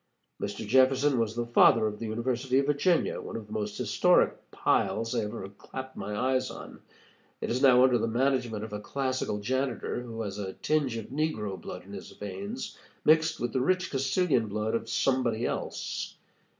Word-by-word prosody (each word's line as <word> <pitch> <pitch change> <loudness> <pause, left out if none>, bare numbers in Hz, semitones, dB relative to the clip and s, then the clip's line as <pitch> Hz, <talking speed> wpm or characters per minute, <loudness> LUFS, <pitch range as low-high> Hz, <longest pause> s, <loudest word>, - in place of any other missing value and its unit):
Mr. 100 +2 -4
Jefferson 130 +2 +4
was 110 -1 0
the 120 0 -1
father 115 -1 +5
of 105 -1 -3
the 115 - -4
University 125 +3 0
of 135 - +3
Virginia, 145 +5 +2
one - - -7
of 115 - -5
the 105 - -10
most 105 -1 -3
historic - - +2
piles 115 +2 +1
I 120 - +1
have 105 - -1
ever 105 -3 -6
clapped 130 +6 -9
eyes 130 +5 -1
on. - - -9 0.6
It - - -3
is 125 +2 0
now 130 -2 +7
under 125 -2 +4
the - - 0
management 120 -2 0
of 110 -1 -7
a 105 - -3
classical 130 -1 -2
janitor, 125 +3 -2
who 115 -2 -5
has 100 -1 -5
a 95 -2 -4
tinge 145 -6 0
of 110 - -7
negro 130 -10 -1
blood - - -7
in - - -12
his - - -8
veins, 210 - -6 0.3
mixed 160 +1 +4
with 120 -1 -2
the 130 - +1
rich 185 +6 +1
Castilian 135 -2 +1
blood 105 +2 -2
of 115 0 -2
somebody 120 -2 +1
else. - - -3
120 Hz, 185 wpm, -29 LUFS, 110-135 Hz, 0.6 s, now